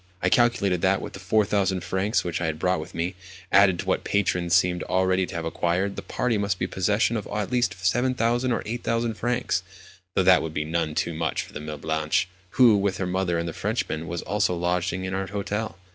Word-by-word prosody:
I 90 - +1
calculated 100 -6 +2
that, 95 +1 +3
with - - -7
the 95 - -8
4000 100 -2 +1
francs 100 +4 0
which 85 -1 -3
I 90 - 0
had 80 -1 -2
brought 90 +2 +1
with 80 +4 -8
me, 85 +3 -1 0.4
added 95 -2 +6
to - - -5
what - - +1
my - - -23
patrons 90 -3 +1
seemed 90 0 +2
already 95 0 +1
to - - -8
have 85 -1 -3
acquired, 90 +4 0
the - - -5
party 125 -4 -1
must 100 -2 0
be - - -1
in - - -8
possession 105 +5 +1
of 105 - -5
at 105 +1 -3
least 125 -1 +1
7000 120 +5 +1
or 115 - -1
8000 115 0 -1
francs—though 95 -6 -3
that 90 0 +6
would 80 -1 -5
be 75 - -1
none 80 -1 -1
too 85 - -1
much 80 -1 -1
for - - -9
Mlle. 75 0 -6
Blanche, 80 +2 0 0.3
who, 120 -5 +7
with 100 -2 0
her 95 - -2
mother 90 -1 0
and 85 0 -2
the 85 - -4
Frenchman, 80 +1 -2
was 85 +2 -4
also 100 -1 0
lodging 90 +1 -1
in 95 - -4
our 95 0 -2
hotel. 105 +2 -3
95 Hz, 220 wpm, -25 LUFS, 85-105 Hz, 0.4 s, who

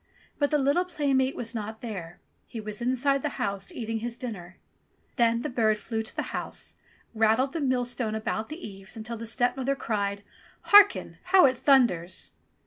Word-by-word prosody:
But 285 -1 +2
the 300 - +2
little 285 +6 +2
playmate 275 -7 0
was 230 -2 -5
not 220 -1 -5
there; 180 -7 -7 0.3
he 230 - -7
was 215 +1 -6
inside 260 +3 +1
the - - -3
house 200 -1 -2
eating 225 -1 -3
his 235 +1 -5
dinner. 185 -8 -7 0.6
Then 235 -1 +2
the - - -1
bird 220 -3 +2
flew 220 +1 -3
to 220 - -8
the - - -1
house, - - -4 0.4
and 225 - -8
rattled 235 +5 +3
the 330 - -2
millstone 245 -4 0
about 220 0 -2
the 315 +4 -7
eaves 195 +2 -11
until 225 +2 -5
the 230 +1 -6
stepmother 250 +3 0
cried, 200 -5 -2 0.5
"Harken! 410 -1 +6
How 370 -1 +6
it 260 -1 +3
thunders 185 - +2
235 Hz, 175 wpm, -27 LUFS, 215-270 Hz, 0.6 s, Harken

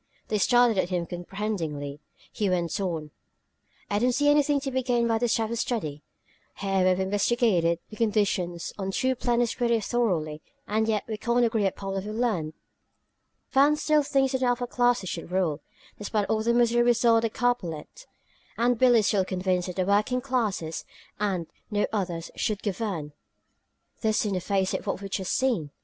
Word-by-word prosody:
They 210 - +1
stared 240 -1 +4
at 180 - 0
him 180 -2 0
uncomprehendingly; 170 -5 -4 0.3
he 205 -2 -1
went 175 +1 -1
on: 160 -5 -3 0.8
"I 205 - 0
don't 250 +3 +3
see 290 +3 +3
anything 290 -1 +3
to 270 -1 -3
be 260 0 0
gained 240 -2 +1
by 225 -1 +1
this 240 -1 +2
type 225 -1 -1
of 235 - -2
study. 155 - -2 0.6
Here 195 -1 +1
we've 185 0 +3
investigated 190 -3 +2
the 215 - -12
conditions 200 -6 0
on 190 -1 -2
two 260 +6 0
planets 240 -1 +1
pretty 235 -2 +1
thoroughly, 180 -10 -1 0.3
and 220 +1 +1
yet 215 -2 +1
we 220 -2 -3
can't 235 +2 +2
agree 220 -3 +1
upon 195 0 -4
what 195 -1 -2
we've 210 +1 -5
learned! 210 -10 -1 1.0
"Van 285 +2 +5
still 305 0 +2
thinks 270 -2 +1
that 260 - 0
the 255 - +1
upper 245 0 +1
classes 245 -4 +1
should 170 -1 -5
rule, 170 -5 0 0.4
despite 210 0 -1
all 220 0 +1
the 230 +2 +2
misery 240 0 +4
we 240 0 +5
saw 235 -1 +4
on - - +2
Capellette! 245 - -2 0.5
And 240 0 +2
Billie 245 -3 +6
is - - -2
still 195 -2 +2
convinced 185 -1 -1
that 180 - -5
the 185 - 0
working 210 +6 +2
classes, 220 -11 -2 0.4
and 190 -5 -1 0.2
no 210 -2 +1
others, 175 -5 -3
should 215 -3 -2
govern! 190 -8 -3 0.9
This, 220 -1 +1
in 205 - -1
the 185 - -1
face 190 0 0
of - - -4
what - - -1
we've 195 -1 -8
just 190 -1 -2
seen! 235 - +1
210 Hz, 185 wpm, -26 LUFS, 185-240 Hz, 1.0 s, Billie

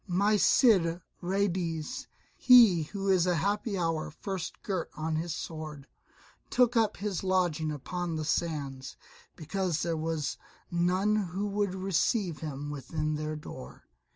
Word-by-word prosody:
My 200 +4 +2
Cid 190 -6 +4 0.2
Ruydiez, 180 - -1 0.3
he 235 -9 +7
who 200 -1 -3
in 185 -1 +3
a 180 - +2
happy 200 +4 -1
hour 165 -3 -1
first 180 +3 -6
girt 190 -5 -2
on 155 +1 -2
his 165 -1 -2
sword, 155 -4 -6 0.6
took 245 -1 +3
up 225 -2 +2
his 200 -1 -3
lodging 175 -5 +1
upon 170 +4 -4
the 155 -1 -3
sands, 140 -5 -2 0.4
because 175 0 -2
there 170 -1 0
was 155 -3 -2 0.3
none 180 +4 +2
who 195 0 -2
would 200 -2 -1
receive 190 -1 0
him 145 -2 -5
within 155 +2 -3
their 155 0 -3
door. 65 - -10
175 Hz, 135 wpm, -29 LUFS, 155-195 Hz, 0.6 s, he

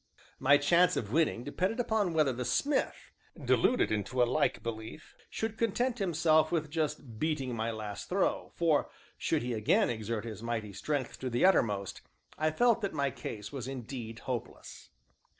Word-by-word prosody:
My 145 +2 +6
chance 170 +5 +4
of 105 -2 -3
winning 155 -5 +1
depended 185 - -1
upon 220 -6 +1
whether 150 -4 +3
the 125 +1 -3
smith, 280 - -1 0.3
deluded 250 - +2
into 110 +4 +1
a - - +5
like 120 - 0
belief, 115 +5 -7
should 220 0 -4
content 240 +2 0
himself 160 -4 +3
with 155 -3 -1
just 145 -8 -3
beating 140 -5 -1
my 115 0 -1
last 110 -2 -6
throw, 190 +1 0
for, 160 -4 +2 0.3
should - - 0
he 125 0 -2
again 110 +1 +2
exert 110 -1 -3
his 110 -2 -7
mighty 115 -3 -3
strength 140 +2 -3
to 130 - -3
the 120 +7 +2
uttermost, 105 - +2 0.3
I 155 0 +1
felt 230 +8 +3
that 200 -5 -2
my 140 -2 +1
case 105 -3 -7
was 130 -4 -5
indeed 120 -3 -6
hopeless. 125 -3 -6
140 Hz, 165 wpm, -31 LUFS, 115-170 Hz, 0.3 s, My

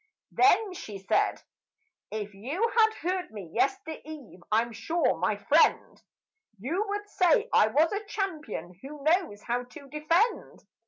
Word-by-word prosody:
Then 405 +1 +4
she 210 - -7
said, 195 - 0 0.7
"If 210 -1 -5
you 295 - -2
had 440 -1 +5
heard 365 +1 -1
me 200 -7 -9
yestereve, 310 - -3
I'm 230 +2 +2
sure, 255 - 0
my 205 +4 0
friend, 300 +10 +2 0.6
You 310 - -1
would 410 +1 -3
say 415 +4 +3
I - - +6
am 220 - -5
a 405 +7 +2
champion 305 - -5
who 285 +1 -9
knows 315 - +1
how 245 +1 -2
to 280 +3 -13
defend." 330 - 0
305 Hz, 140 wpm, -28 LUFS, -, 0.7 s, I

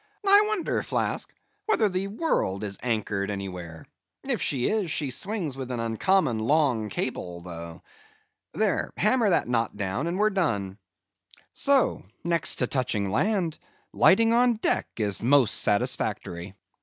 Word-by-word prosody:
I 405 +2 +7
wonder, 430 -5 -1
Flask, - - -2 0.4
whether 230 - +3
the 190 0 -2
world 200 - -1
is 100 -2 -4
anchored 105 -4 -1
anywhere; 90 -5 -6 0.4
if - - 0
she 125 -3 +1
is, 210 -5 0
she 145 -3 0
swings 180 - -3
with 130 -2 -6
an 125 -2 -3
uncommon 115 - +1
long 125 -3 +1
cable, 90 -7 -4
though. 85 -1 -9 0.7
There, - - -1
hammer 215 +2 +3
that 175 - +2
knot 115 -3 -1
down, 100 - -2
and 175 +2 -2
we've 215 0 +2
done. 105 - -1 0.7
So; 275 -2 +2 0.2
next 170 -2 +2
to 125 - +1
touching 115 -7 -1
land, 180 - 0 0.3
lighting 225 +4 +5
on 240 0 +4
deck 220 - 0
is 105 -4 0
the 115 - -3
most 135 -5 +4
satisfactory. 95 -2 -1
130 Hz, 145 wpm, -26 LUFS, -, 0.7 s, I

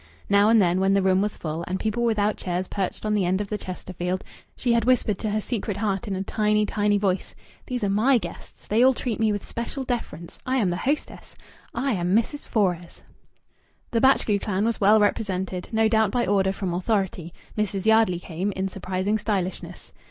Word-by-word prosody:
Now 200 +1 +5
and 225 0 +6
then 180 -2 +3
when 195 +1 +3
the 195 - +3
room 190 0 +3
was 210 0 -2
full, 160 +1 -4
and 185 +1 -2
people 220 +2 -1
without 215 -3 +1
chairs 180 0 -3
perched 195 +1 -3
on 215 - +1
the 205 -2 +2
end 185 +2 +1
of 205 -1 -4
the 210 - -2
Chesterfield, 185 0 -4 0.3
she 245 -2 +1
had 230 -1 +3
whispered 225 -5 +2
to 215 - -2
her 210 +1 0
secret 210 -2 -3
heart 205 +1 -1
in 195 - -2
a 190 - -2
tiny, 210 +1 +1
tiny 205 0 +1
voice: 195 -2 -1 0.3
"These 250 -4 -3
are 200 - +1
my 230 +7 +4
guests. 225 - -9
They 220 +3 +2
all 260 0 +5
treat 230 -3 -3
me 220 -1 +3
with 205 -1 -4
special 235 +3 -4
deference. 230 -9 -5
I 260 +1 0
am 200 -8 +2
the - - -1
hostess. 285 +9 -3 0.4
I 275 0 0
am 180 -2 +1
Mrs. 235 +6 0
Fores." 180 -5 -1 0.9
The 230 - +1
Batchgrew 250 -6 +3
clan 205 0 -1
was 230 -1 -1
well 210 +2 +6
represented, 190 -3 -1
no 220 0 +3
doubt 220 -2 +3
by 240 +3 0
order 190 0 +2
from 190 -2 -3
authority, 185 -3 -1 0.2
Mrs. 205 -2 -2
Yardley 220 -5 +4
came, 180 +3 -3
in 190 +1 -2
surprising 190 +2 -2
stylishness. 195 -4 -3
205 Hz, 205 wpm, -24 LUFS, 185-220 Hz, 0.9 s, and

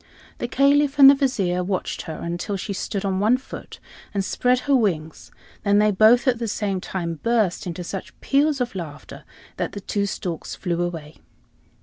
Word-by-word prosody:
The 240 - -2
Caliph 280 +2 +3
and 275 -1 +10
the - - +5
Vizier 205 -11 0
watched 185 0 -3
her, 160 - -4
until 175 +4 -4
she 200 +2 -4
stood 200 +1 -3
on 190 -1 0
one 220 +5 +4
foot 265 - -10 0.4
and 195 -1 0
spread 250 +3 +1
her 280 0 +2
wings; 165 - -1 0.3
then 205 0 +3
they 210 0 +4
both, 220 +6 +5
at 245 -3 +2
the 230 - -2
same 200 -3 -2
time, 170 -4 -4
burst 220 -6 +1
into 175 +1 -5
such 190 +2 -7
peals 285 +1 +2
of 245 -1 -2
laughter 155 -5 -8 0.3
that - - -3
the 200 - -5
two 200 +1 -1
storks 175 -4 -5
flew 175 -2 -2
away. 165 -3 -5
200 Hz, 185 wpm, -23 LUFS, 180-245 Hz, 0.4 s, and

